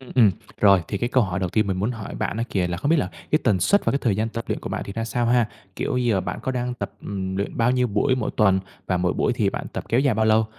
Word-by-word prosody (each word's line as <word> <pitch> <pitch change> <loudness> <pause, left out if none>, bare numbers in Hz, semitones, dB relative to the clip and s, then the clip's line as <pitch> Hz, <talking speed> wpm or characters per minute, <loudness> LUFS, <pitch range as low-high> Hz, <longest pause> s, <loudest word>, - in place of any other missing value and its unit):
Ừm, 130 - -13
ừm, 115 -5 +6 0.3
rồi 100 -3 +6
thì 100 - -2
cái 120 - -1
câu 130 0 +3
hỏi 95 -4 -2
đầu 95 -2 -1
tiên 105 +3 +1
mình 95 -2 -1
muốn 105 +5 0
hỏi 110 -4 -6
bạn - - -2
á 115 - -1
kìa 90 -3 +1
là 85 - -2
không 145 - -1
biết 165 - +5
là 145 - 0 0.2
cái 155 - +4
tần 105 -6 +3
suất 200 - +3
và - - +2
cái 140 - +1
thời 110 -7 +1
gian 110 +2 0
tập 115 +1 -5
luyện - - -2
của - - -6
bạn - - -3
thì 100 - -7
ra 115 +1 -3
sao 120 +1 -1
ha? 120 -2 +3 0.3
Kiểu - - -1
giờ 120 -6 +2
bạn - - -4
có 130 - -1
đang 125 0 -2
tập, - - -5
ừm, 95 -1 -4
luyện 100 +1 -3
bao 120 +1 +3
nhiêu 125 0 +2
buổi 115 +5 +1
mỗi 125 -4 -2
tuần 95 -3 +4 0.3
và 90 - +1
mỗi 90 0 +1
buổi - - +1
thì - - +1
bạn - - -5
tập - - -4
kéo 120 - +3
dài 135 -4 +2
bao 110 +1 +2
lâu? 110 0 +4
110 Hz, 325 wpm, -23 LUFS, 100-125 Hz, 0.3 s, ừm